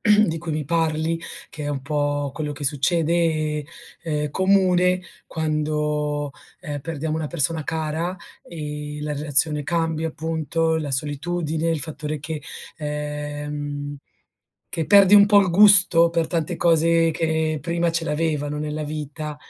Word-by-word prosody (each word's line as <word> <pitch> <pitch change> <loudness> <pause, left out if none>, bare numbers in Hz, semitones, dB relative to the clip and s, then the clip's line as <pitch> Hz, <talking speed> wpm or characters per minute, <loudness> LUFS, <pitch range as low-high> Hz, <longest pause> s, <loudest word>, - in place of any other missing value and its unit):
di 210 -6 +3
cui 165 -1 -5
mi 150 0 -2
parli, 165 +1 0 0.3
che 150 - -7
è 145 - -2
un 140 -2 -3
po' 145 -1 -1
quello 150 -1 -4
che 145 - -7
succede, 155 +1 +1 0.4
è 150 -3 -2
comune 185 0 +3 0.2
quando, 150 -2 -1 0.3
ehm, 145 -4 -5
perdiamo 155 0 -3
una 160 -1 -2
persona 155 +1 0
cara, 160 +3 -2 0.3
ehm, 150 -2 -6
la 150 0 -3
relazione 150 +1 +1
cambia, 165 0 -1
appunto, 160 +1 -1
la 150 -3 -3
solitudine, 155 +4 -1
il 160 -3 0
fattore 150 +1 -2
che 155 +1 -5 0.4
ehm, 145 -1 -4 0.7
che 165 -2 -2
perdi 200 -1 +7
un 205 0 +8
po' 205 -1 +6
il 190 - +1
gusto 185 -3 +7
per 165 -1 0
tante 165 0 -2
cose 165 0 +3
che 160 -1 -1
prima 170 +2 0
ce 165 0 0
l'avevano 150 -1 -1
nella 150 0 -3
vita. 150 0 -5
155 Hz, 140 wpm, -23 LUFS, 150-165 Hz, 0.7 s, un